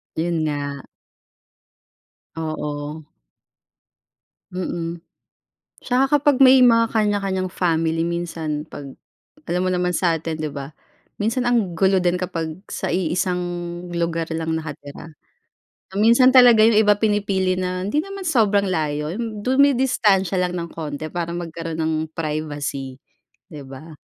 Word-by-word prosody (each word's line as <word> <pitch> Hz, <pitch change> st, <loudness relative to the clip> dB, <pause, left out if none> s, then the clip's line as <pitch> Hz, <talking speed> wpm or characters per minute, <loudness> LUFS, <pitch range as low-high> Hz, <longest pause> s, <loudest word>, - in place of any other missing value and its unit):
'Yun 160 Hz, -1 st, -1 dB
nga. 145 Hz, -2 st, -4 dB, 1.5 s
Oo. 150 Hz, -1 st, -5 dB, 1.5 s
Mm, 170 Hz, -2 st, -4 dB, 0.8 s
tsaka 265 Hz, +3 st, +2 dB
kapag 285 Hz, -2 st, +2 dB
may 260 Hz, -1 st, +7 dB
mga 230 Hz, -1 st, +5 dB
kanya-kanyang 195 Hz, -4 st, 0 dB
family 165 Hz, -2 st, 0 dB
minsan 165 Hz, -3 st, -3 dB
pag 145 Hz, -3 st, -10 dB, 0.6 s
alam 180 Hz, +1 st, 0 dB
mo -, -, +1 dB
naman 180 Hz, 0 st, 0 dB
sa'tin 165 Hz, -3 st, -1 dB
'di 155 Hz, -, -2 dB
ba. 140 Hz, +1 st, -7 dB, 0.5 s
Minsan 230 Hz, +4 st, 0 dB
ang 215 Hz, -8 st, +1 dB
gulo 190 Hz, +2 st, +3 dB
din 180 Hz, 0 st, +1 dB
kapag 170 Hz, -1 st, -4 dB
sa -, -, -3 dB
iisang 180 Hz, +1 st, 0 dB, 0.5 s
lugar 170 Hz, -1 st, -2 dB
lang 160 Hz, 0 st, -2 dB
nakatira, 150 Hz, 0 st, -8 dB, 0.9 s
minsan 235 Hz, +4 st, +6 dB
talaga 245 Hz, -4 st, +7 dB
'yung 225 Hz, -2 st, +4 dB
iba 205 Hz, -1 st, +4 dB
pinipili 200 Hz, -3 st, +1 dB
na 185 Hz, 0 st, -2 dB
hindi 295 Hz, +9 st, 0 dB
naman 390 Hz, 0 st, -8 dB
sobrang 210 Hz, -, +2 dB
layo 150 Hz, -1 st, -2 dB
'yung 215 Hz, -2 st, -5 dB
dumidistansiya 250 Hz, -8 st, +3 dB
lang 180 Hz, 0 st, -1 dB
ng 170 Hz, -1 st, -5 dB
konti 155 Hz, -1 st, -5 dB
para 170 Hz, -1 st, -3 dB
magkaroon 165 Hz, -1 st, -5 dB
ng 160 Hz, 0 st, 0 dB, 0.2 s
privacy, 145 Hz, -4 st, -4 dB, 0.5 s
'di 150 Hz, -, -8 dB
ba? 150 Hz, +3 st, -11 dB
175 Hz, 120 wpm, -21 LUFS, 160-210 Hz, 1.5 s, may